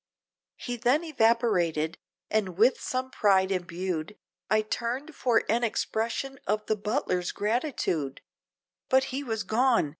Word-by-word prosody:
He 245 0 -4
then 250 +7 +2
evaporated, 225 - +1 0.3
and 195 -5 0
with 235 +5 +4
some 260 0 -2
pride 190 -2 +3
embued, 180 0 -3 0.3
I 215 0 +3
turned, 245 +8 -3
for 245 -4 +2
an 235 +2 +1
expression 235 +4 -1
of 210 +1 0
the 215 - +1
butler's 195 -4 -1
gratitude, 210 - -1 0.7
But 265 0 +5
he 275 +2 -2
was 225 -5 -2
gone! 230 - +2
220 Hz, 125 wpm, -28 LUFS, 190-250 Hz, 0.7 s, But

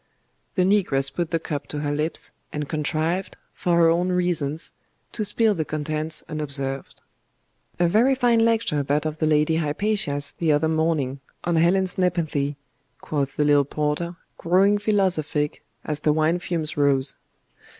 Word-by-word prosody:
The 185 - +3
negress 160 -9 +2
put 170 -2 -2
the 165 - +1
cup 150 -3 -5
to 150 - -4
her 145 -1 -1
lips, 155 +3 -3 0.2
and 150 -1 -4
contrived, 160 +4 -1
for 175 -1 0
her 170 -1 +6
own 175 +2 +1
reasons, 170 -4 0 0.4
to 220 - -3
spill 220 +1 +2
the 165 -5 -1
contents 155 +1 -1
unobserved. 140 -3 -3 0.8
'A 175 - +4
very 235 +9 +4
fine 245 -3 +3
lecture 225 -10 +2
that 145 +2 0
of 155 0 -3
the 155 - +1
Lady 155 +1 +3
Hypatia's 150 -3 -1
the 160 -3 +3
other 150 +2 +2
morning, 160 -4 0 0.2
on 170 -1 +1
Helen's 185 +3 +2
nepenthe,' 155 -6 0 0.4
quoth 140 -2 -2
the 150 - +2
little 145 -1 +5
porter, 150 +5 -2 0.2
growing 195 +4 +3
philosophic 185 -8 0 0.2
as 150 -1 -2
the 150 0 +2
wine 160 +3 +2
fumes 165 -3 -3
rose. 140 -2 +2
155 Hz, 150 wpm, -24 LUFS, 150-180 Hz, 0.8 s, her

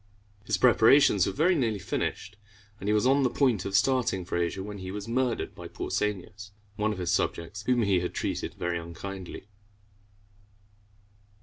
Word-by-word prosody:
His - - 0
preparations 120 -4 +5
were 155 - +2
nearly 120 - 0
finished, 100 +2 -3 0.4
and 100 - -3
he - - +3
was 105 +2 +2
on 135 +2 +4
the 130 - +3
point 120 -6 +1
of 100 0 -2
starting 110 -5 +2
for - - -4
Asia, 85 +2 -1
when 105 0 -7
he 95 0 -6
was 100 +2 -6
murdered 125 0 -1
by - - -9
Pausanias, 105 0 -3 0.3
one 105 +1 0
of 105 - -4
his 90 -1 -1
subjects, 85 +5 -1
whom 125 -2 +3
he 100 -3 +3
had 90 - -4
treated - - -3
very 85 -1 -2
unkindly. 90 +3 -8
105 Hz, 165 wpm, -28 LUFS, 95-120 Hz, 0.4 s, preparations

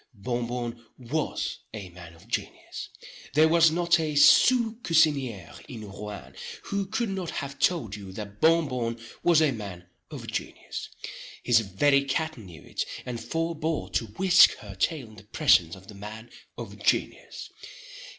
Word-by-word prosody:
Bon 120 +3 -2
Bon 120 -1 -4
was 135 +5 -3 0.2
a 100 -4 -7
man 85 -1 -12
of 85 +6 -19
genius. 115 - -5 0.5
There 155 +1 +6
was 165 0 +6
not 170 +1 +2
a 155 -2 -2
sous 235 - +6
cusinier 140 - +2
in 110 -3 -8
Rouen, 105 0 -8 0.3
who 200 -1 -2
could 220 +2 -1
not 190 -3 -3
have 140 -1 -5
told 140 - +1
you 100 -2 -9
that 105 0 -8
Bon 165 0 +5
Bon 120 -3 -3 0.2
was 165 -2 +5
a 150 - +3
man 100 -7 -7 0.2
of - - -8
genius. - - -5 0.5
His 120 -2 +5
very 140 +8 +2
cat 155 +3 -1
knew 90 -8 -12
it, - - -3 0.2
and 120 -2 -5
forebore 160 - -2
to 110 +4 0
whisk 185 - +6
her 105 -3 -10
tail 135 - -1
in 110 - -16
the 110 - -13
presence 100 - +3
of 95 -1 -15
the 105 - -10
man 110 +4 -9 0.3
of - - -8
genius. - - -1
120 Hz, 160 wpm, -27 LUFS, 105-160 Hz, 0.5 s, There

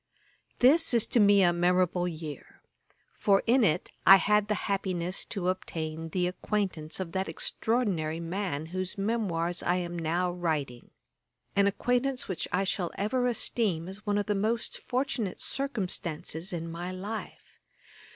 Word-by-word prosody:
] - - -39
This 310 0 +6
is 230 - +4
to 240 - +1
me 200 -2 +6
a 175 -1 +4
memorable 180 0 +2
year; 155 -4 -8 0.5
for 195 -1 +2
in 245 +2 +4
it 180 -3 +1
I 195 - +10
had 210 +1 +3
the 210 - +1
happiness 185 -2 -1
to 190 -4 -3
obtain 160 -3 -4
the 180 +2 0
acquaintance 180 -4 -2
of 180 -3 -4
that 190 +1 -2
extraordinary 185 -10 -1
man 170 -3 -3
whose 185 +1 -3
memoirs 190 -5 -1
I 175 - +1
am 175 -1 -3
now 175 +3 0
writing; 155 -8 -3 0.7
an 200 0 +4
acquaintance 250 +5 0
which 185 -4 -3
I 185 +3 +1
shall 185 -2 -1
ever 245 +5 +1
esteem 210 -8 0
as 195 +2 -7
one 205 -1 0
of 205 - 0
the 210 - 0
most 215 +3 -1
fortunate 250 -6 -2
circumstances 185 - -2
in 165 -1 -4
my 175 +2 -5
life. 200 +4 -7
185 Hz, 150 wpm, -29 LUFS, 170-210 Hz, 0.7 s, I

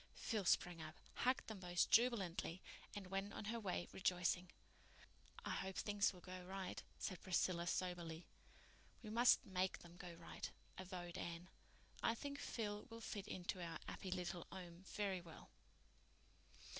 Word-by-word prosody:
Phil 215 -5 0
sprang 175 -1 +4
up, 155 +1 -6 0.2
hugged 255 +1 +3
them 220 -3 -5
both 175 -1 +3
jubilantly, 190 -7 +4 0.4
and 205 -2 -3
went 195 +1 0
on - - -4
her 230 +3 0
way 185 -4 0
rejoicing. 180 -1 +2 1.0
"I - - 0
hope 190 0 -1
things 205 +1 +3
will 180 - -12
go 185 +1 -6
right," 190 +1 -3 0.2
said 185 -4 -2
Priscilla 175 -1 +2
soberly. 175 -2 0 0.8
"We 215 - -4
must 240 +2 +7
make 185 -1 +1
them 175 0 -12
go 175 -1 -6
right," 165 0 -5 0.3
avowed 180 -2 -4
Anne. 170 +2 -3 0.5
"I 230 - +4
think 280 +3 -3
Phil 210 -2 -2
will 230 0 -6
fit 205 -2 -3
into 185 -1 -2
our 165 -1 -2
'appy 190 - -4
little 180 -1 -1
'ome 175 -1 -7
very 195 -3 0
well." 165 -2 -11
185 Hz, 150 wpm, -44 LUFS, 175-205 Hz, 1.0 s, must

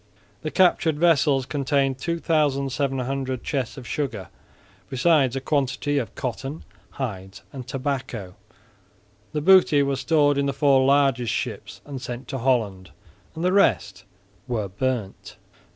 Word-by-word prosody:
The 155 - -3
captured 170 -3 +3
vessels 150 -5 +3
contained 135 -1 0
2700 135 -5 -1
chests 135 -4 -3
of 130 - -9
sugar, 125 - -4 0.6
besides 135 -1 +2
a - - -1
quantity 140 0 0
of 120 - -6
cotton, 135 +5 -5 0.3
hides 95 -7 -6
and 130 -3 -8
tobacco. 130 -8 -4 1.0
The 150 - -1
booty 180 -4 +5
was 140 -1 -1
stored 145 -2 +2
in 140 - +1
the 140 - -1
four 135 -1 +4
largest 135 -4 +3
ships - - -5
and 140 -3 -7
sent 125 0 -6
to 135 - -3
Holland; 110 -7 0 0.5
the 180 +3 +1
rest 105 - +2 0.4
were 110 -5 -2
burnt. 110 0 -4
135 Hz, 125 wpm, -24 LUFS, 125-145 Hz, 1.0 s, booty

